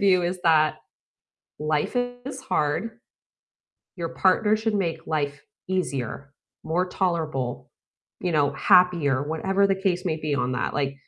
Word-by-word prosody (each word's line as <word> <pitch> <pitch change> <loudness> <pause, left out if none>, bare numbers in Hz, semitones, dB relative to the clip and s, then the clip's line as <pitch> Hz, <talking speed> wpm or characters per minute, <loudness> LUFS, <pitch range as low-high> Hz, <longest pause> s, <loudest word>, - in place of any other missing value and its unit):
view 185 -3 +4
is 180 +1 -2
that 155 -2 +4 0.8
life 150 - -1
is 245 +2 -3
hard, 185 +8 -1 1.0
your 170 -1 -3
partner 210 +5 +3
should 220 0 -1
make 170 -4 -1
life 145 -3 -2 0.2
easier, 140 -7 -3 0.3
more 175 +3 0
tolerable, 160 -10 -2 0.5
you 180 - -1
know, 145 -3 +2
happier, 170 -7 +4
whatever 190 +6 +1
the 195 - +2
case 190 -1 -1
may 160 -4 0
be 155 -2 -2
on 125 -1 0
that, 125 - -2
like, 140 -1 -1
170 Hz, 135 wpm, -25 LUFS, 145-190 Hz, 1.0 s, view